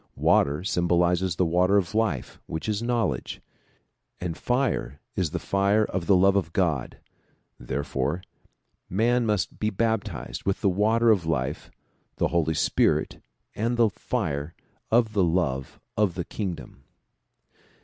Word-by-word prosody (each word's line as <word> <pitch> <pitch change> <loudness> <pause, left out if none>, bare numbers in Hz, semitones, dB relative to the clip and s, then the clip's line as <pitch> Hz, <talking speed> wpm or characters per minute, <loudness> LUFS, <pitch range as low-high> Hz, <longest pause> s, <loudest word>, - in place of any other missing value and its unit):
Water 75 +5 +3
sym 85 -2 0
bolizes 90 0 +2
the 90 - +2
water 90 +4 +3
of 95 +1 0
life 110 - -1
which 80 - -4
is 105 0 -1
knowledge, 115 - -1 0.8
and 85 -2 -3
fire 125 - -1 0.2
is 90 -5 0
the - - -3
fire 100 +2 +2
of 90 -2 -4
the 100 - +6
love 95 +2 +4
of 90 -4 0
God; 80 -9 0 0.6
therefore 65 +6 -2 0.7
man 115 +5 +2
must 105 -3 -1
be 105 - +1
baptized 110 - -2
with 95 0 -1
the 100 - +3
water 110 +5 +3
of 95 -7 +1
life, 70 -3 -2 0.5
the - - 0
Holy 80 -2 +1
Spirit - - +1 0.3
and 115 +3 -1
the 115 -2 +4
fire 80 - -3 0.3
of 115 -1 +3
the 100 -3 +3
love 80 -7 -1 0.2
of 105 -5 +1
the 90 -3 -3
kingdom. 90 -10 -6
95 Hz, 140 wpm, -26 LUFS, 80-110 Hz, 0.8 s, the